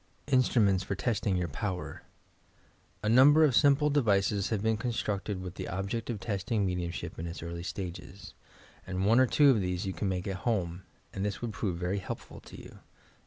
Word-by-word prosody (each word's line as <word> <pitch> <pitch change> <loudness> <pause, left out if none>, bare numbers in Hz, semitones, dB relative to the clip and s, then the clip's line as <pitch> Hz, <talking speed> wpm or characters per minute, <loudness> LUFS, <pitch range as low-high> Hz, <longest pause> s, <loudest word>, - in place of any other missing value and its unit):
INSTRUMENTS 110 -8 +3
FOR - - -3
TESTING 105 -6 0
TOUB 85 -3 -3
POWKB 90 +4 -4 1.0
A 105 - +1
number 140 +7 +7
of 140 -6 +4
simple 145 +2 +4
devices 100 -7 +2
have 110 -3 -1
been 110 0 +2
constructed 105 -4 -2
with 90 -1 -6
the - - -6
object 100 +5 -3
of 115 -4 -3
testing 100 0 -1
mediumsbip 90 -2 -4
in 85 - -4
its 85 -1 -7
early 85 0 -5
stages, 95 +1 -7 0.5
and 95 0 -2
one 115 +4 +5
or 130 - +5
two 145 +3 +5
of 110 -6 +2
these 90 0 -2
you 95 - -2
could 100 - -3
make 95 0 -2
at 95 -2 -3
home, 95 -6 -2 0.3
and 95 - -3
this 105 -1 -2
would 115 -3 -3
prove 95 -5 -2
very 90 +3 -1
helpful 95 - -7
to - - -12
you. - - -13
100 Hz, 190 wpm, -30 LUFS, 90-115 Hz, 1.0 s, number